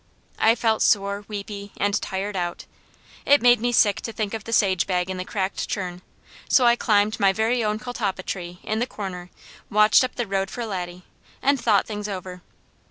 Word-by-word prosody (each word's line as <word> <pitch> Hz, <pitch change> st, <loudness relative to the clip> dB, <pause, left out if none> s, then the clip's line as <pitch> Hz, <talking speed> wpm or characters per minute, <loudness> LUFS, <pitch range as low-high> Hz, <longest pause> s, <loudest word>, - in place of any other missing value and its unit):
I 225 Hz, +1 st, +5 dB
felt 225 Hz, -2 st, +1 dB
sore, 200 Hz, 0 st, +2 dB
weepy, 200 Hz, -1 st, -7 dB
and 205 Hz, 0 st, 0 dB
tired 195 Hz, +1 st, -4 dB
out. 175 Hz, -2 st, -3 dB, 0.6 s
It 285 Hz, +1 st, +5 dB
made 245 Hz, -1 st, +6 dB
me 245 Hz, +1 st, +1 dB
sick 210 Hz, -4 st, +3 dB
to 225 Hz, -, -5 dB
think 215 Hz, -2 st, -3 dB
of 220 Hz, -3 st, -5 dB
the 230 Hz, -, -6 dB
sage 190 Hz, -5 st, +2 dB
bag 180 Hz, -1 st, 0 dB
in 185 Hz, -, -4 dB
the 185 Hz, -, -3 dB
cracked 190 Hz, 0 st, -3 dB
churn, 180 Hz, -5 st, -4 dB, 0.5 s
so 255 Hz, -, +5 dB
I 235 Hz, 0 st, +6 dB
climbed 210 Hz, -2 st, +2 dB
my 195 Hz, -2 st, +4 dB
very 225 Hz, +4 st, 0 dB
own 210 Hz, 0 st, 0 dB
catalpa 215 Hz, -5 st, -3 dB
tree 175 Hz, -2 st, -5 dB
in 215 Hz, +1 st, -2 dB
the 245 Hz, -, 0 dB
corner, 180 Hz, -5 st, -7 dB, 0.4 s
watched 215 Hz, +4 st, +5 dB
up 255 Hz, -, -3 dB
the 240 Hz, -, -2 dB
road 195 Hz, -1 st, -1 dB
for 240 Hz, +3 st, -5 dB
Laddie, 180 Hz, -3 st, -5 dB, 0.4 s
and 275 Hz, -1 st, +1 dB
thought -, -, +3 dB
things 210 Hz, -1 st, -5 dB
over. 185 Hz, -2 st, -6 dB
205 Hz, 195 wpm, -24 LUFS, 190-225 Hz, 0.6 s, made